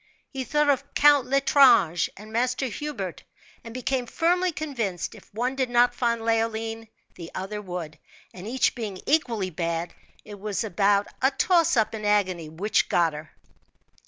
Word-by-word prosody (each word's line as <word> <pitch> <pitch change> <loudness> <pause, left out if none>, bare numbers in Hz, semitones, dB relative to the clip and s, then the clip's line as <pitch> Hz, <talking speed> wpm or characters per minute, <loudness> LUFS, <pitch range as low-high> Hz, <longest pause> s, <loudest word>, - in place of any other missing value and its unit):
He 265 -2 -4
thought 300 +2 +1
of 280 0 -3
Count 290 -3 +5
L'Estrange 260 - +4
and 215 +2 -12
Master 250 +3 0
Hubert, 235 - -5 0.4
and 230 - -9
become 255 +1 -2
firmly 355 +6 +1
convinced, 240 - -4
if - - -16
one 245 +5 -2
did 260 -2 -1
not 245 0 +4
find 235 -2 0
Leoline 225 0 -1 0.3
the 170 -1 -9
other 210 +3 -4
would; 175 -5 -7 0.3
and 185 +2 -9
each 255 +3 +1
being 210 -6 -6
equally 230 -11 0
bad, 170 +1 -3 0.3
it 205 -1 -10
was 205 +1 -2
about 200 0 +2 0.2
a 265 - +4
toss 330 0 +2
up 220 -1 +2
in 215 -1 -6
agony 185 -6 +1
which 185 +7 0
got 170 -2 +2
her. 150 0 -9
225 Hz, 160 wpm, -25 LUFS, 190-265 Hz, 0.4 s, Count